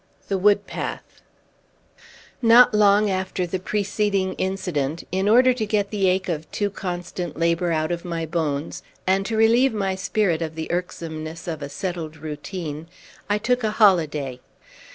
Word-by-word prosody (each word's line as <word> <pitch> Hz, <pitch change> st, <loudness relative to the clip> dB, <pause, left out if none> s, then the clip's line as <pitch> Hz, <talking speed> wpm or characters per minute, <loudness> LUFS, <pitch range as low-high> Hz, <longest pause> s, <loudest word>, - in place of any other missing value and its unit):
XI. -, -, -30 dB
THE 195 Hz, -, +1 dB
WOOD 205 Hz, +1 st, +4 dB
PATH -, -, -6 dB, 1.2 s
Not 235 Hz, 0 st, +7 dB
long 205 Hz, 0 st, +4 dB
after 185 Hz, -1 st, -2 dB
the 185 Hz, +2 st, -3 dB
preceding 200 Hz, 0 st, 0 dB
incident, 170 Hz, -6 st, -2 dB
in 190 Hz, +3 st, +1 dB
order 250 Hz, +3 st, +6 dB
to 245 Hz, -3 st, -3 dB
get 205 Hz, -1 st, 0 dB
the 200 Hz, -3 st, +1 dB
ache 190 Hz, +1 st, 0 dB
of 160 Hz, -3 st, -3 dB
too 205 Hz, -1 st, -1 dB
constant 180 Hz, -3 st, -5 dB
labor 170 Hz, +1 st, +1 dB
out 155 Hz, 0 st, 0 dB
of 170 Hz, -1 st, -3 dB
my 170 Hz, -2 st, -3 dB
bones, 160 Hz, 0 st, -2 dB, 0.2 s
and 195 Hz, +1 st, +1 dB
to 225 Hz, -, -2 dB
relieve 230 Hz, +3 st, +4 dB
my 195 Hz, -2 st, 0 dB
spirit 180 Hz, -2 st, 0 dB
of 160 Hz, -1 st, -4 dB
the 160 Hz, 0 st, -4 dB
irksomeness 165 Hz, -2 st, -5 dB
of 160 Hz, -3 st, -4 dB
a 140 Hz, -, -5 dB
settled 160 Hz, 0 st, -5 dB
routine, 155 Hz, +1 st, -6 dB, 0.4 s
I 205 Hz, -, +2 dB
took 245 Hz, +3 st, 0 dB
a 215 Hz, -, +2 dB
holiday. 155 Hz, -, +3 dB
185 Hz, 160 wpm, -23 LUFS, 160-205 Hz, 1.2 s, Not